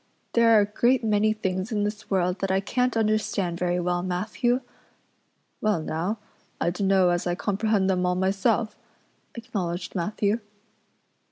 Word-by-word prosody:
There 230 -1 +5
are - - +6
a - - +2
great 240 +4 +2
many 215 0 +2
things 190 0 -2
in 210 -2 0
this 210 0 -4
world 180 -1 +1
that 195 - -1
I 190 0 +2
can't 250 +4 0
understand 210 -5 0
very 180 0 0
well, 175 0 0
Matthew." 215 +8 0 1.0
"Well 215 -5 +2
now, 175 +8 -2 0.4
I 170 - +1
dunno 190 0 +3
as 175 0 0
I 175 - 0
comprehend 205 +1 0
them 185 -1 +1
all 180 - +1
myself," 195 +4 +1 0.6
acknowledged 180 -6 -4
Matthew. 205 +4 0
200 Hz, 150 wpm, -25 LUFS, 180-215 Hz, 1.0 s, are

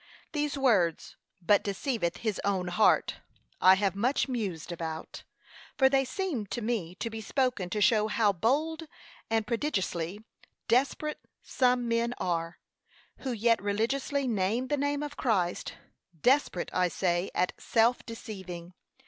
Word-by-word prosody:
These 295 -1 -1
words, 200 - +2 0.3
'but 205 +4 +5
deceiveth 200 -3 -2
his 215 -3 -1
own 190 -3 0
heart,' 210 +5 +3 0.4
I 185 +1 +8
have 195 -1 0
much 250 +9 +1
mused 200 - -3
about: 160 -1 -6 0.6
for 265 -2 +6
they 270 0 +3
seem 260 - -3
to 240 - -4
me 210 -7 -2
to 230 +4 -4
be 225 0 -5
spoken 245 -4 0
to 210 +2 -2
show 215 -2 +4
how 215 -2 +2
bold 310 - 0 0.4
and 225 -1 +1
prodigiously 205 - -2 0.4
desperate 280 +5 +1 0.2
some 250 -2 +1
men 235 +1 0
are, 170 -1 -2 0.6
who 265 - -4
yet 230 0 +2
religiously 260 +7 0
name 225 +3 0
the 290 - +2
name 285 +1 -1
of 290 -1 -6
Christ: 185 -8 0 0.4
desperate, 255 - +2
I 180 0 +3
say, 175 +1 0
at 180 - +1
self 235 +2 +2
deceiving. 185 -6 -8
225 Hz, 140 wpm, -29 LUFS, 185-260 Hz, 0.6 s, I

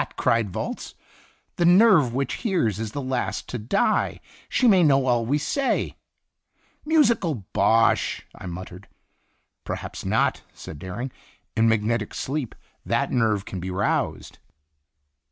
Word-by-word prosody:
cried 115 -3 +2
Volz; - - -5 0.6
"the 175 - +1
Sin 175 +1 +6
Itinerant 195 - +6
nerve 120 - -7
which 140 +1 -1
hears 165 - 0
is 110 -1 -5
last 130 -3 -2
to 125 - -4
die. 120 - +1 0.3
She 255 - +2
may 195 -5 +6
know 140 -4 +4
all 120 -3 +1
we 145 +4 +2
say." 270 - -1 0.9
"Musical 225 - +2
bosh!" 115 +3 +2
I - - -9
muttered. 90 +2 -8 0.8
"Perhaps - - -6
not," - - +1
said 75 - -9
Dering; 115 - -5 0.4
"in 115 0 +3
magnetic 110 0 0
sleep 135 -3 -3 0.3
that - - 0
nerve 110 -5 +1
can 95 - -6
be 90 +2 -5
roused." 95 +2 -2
120 Hz, 135 wpm, -24 LUFS, 105-160 Hz, 0.9 s, Sin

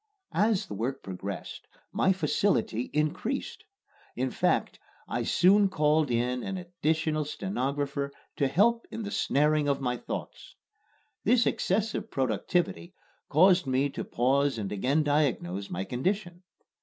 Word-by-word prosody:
As 210 -2 +2
the - - -8
work 125 +7 -3
progressed 95 +1 -6 0.2
my 190 - +2
facility 160 - 0
increased. 185 - -2 0.5
In - - -1
fact, - - 0 0.3
I - - -2
soon 195 +2 +4
called 155 -4 +2
in 125 +1 0
an 190 +7 -4
additional 160 -3 -1
stenographer 140 -3 -2 0.3
to 140 - +2
help 230 - +2
in 225 - -5
the 205 - -5
snaring 150 -2 +2
of 140 -1 +1
my 125 -2 -1
thoughts. - - -7 0.7
This 235 +2 +4
excessive 215 +3 0
productivity 175 - -1 0.3
caused 180 +2 +5
me 135 +2 +1
to - - -4
pause 135 +2 +1
and 100 -3 -4
again 130 +10 +1
diagnose 125 - 0
my 90 +2 -3
condition. 175 - -2
150 Hz, 130 wpm, -28 LUFS, 130-190 Hz, 0.7 s, caused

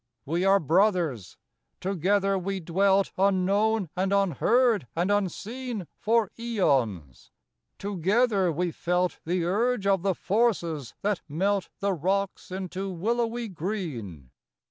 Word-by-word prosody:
We 170 +5 -1
are 195 +1 +5
brothers: 165 - +1 0.4
together 195 +2 +1
we 195 +1 -2
dwelt 195 +3 +2
Unknown 200 +2 +2
and 190 +1 0
unheard 200 - +2
and 175 +4 +1
unseen 210 +3 -2
For 225 -2 +2
aeons; 130 - -1 0.5
together 200 +1 +1
we 175 +2 -1
felt 180 +1 -1
The 175 +1 0
urge 215 +4 +1
of 195 -2 +3
the 190 -1 0
forces 175 - 0
that 205 -2 0
melt 190 +5 0
The 200 0 +1
rocks 190 +4 -1
into 190 +1 -4
willowy^ 230 +4 -2
green. 135 - -5
195 Hz, 115 wpm, -27 LUFS, 170-205 Hz, 0.5 s, are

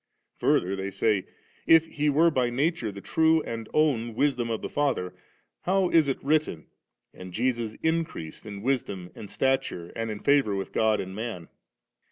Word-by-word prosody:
Further 95 +2 +2
they 95 0 -3
say; 100 0 0 0.2
* - - -33
If 160 - -3
He 150 -2 -1
were 160 +4 +4
by 125 -4 +1
nature 135 -2 0
the 100 0 -9
true 160 +4 +3
and 115 -1 -6
own 120 -7 +1
Wisdom 125 -3 +1
of 115 - -3
the - - -2
Father, 135 -11 -1 0.5
how 190 0 +1
is 160 -3 +5
it 135 - 0
written, 145 - 0 0.5
*And 90 0 -10
Jesus 115 +1 -1
increased 160 - -2
in 100 -1 -7
wisdom 100 -9 -2
and 105 - -10
suture, 130 -10 -1
and 115 0 -3
in 105 - -4
favour 140 -7 +3
with 95 - -4
God 110 -1 +2
and 95 0 -5
man^?' 110 -6 -5
120 Hz, 175 wpm, -27 LUFS, 100-145 Hz, 0.5 s, is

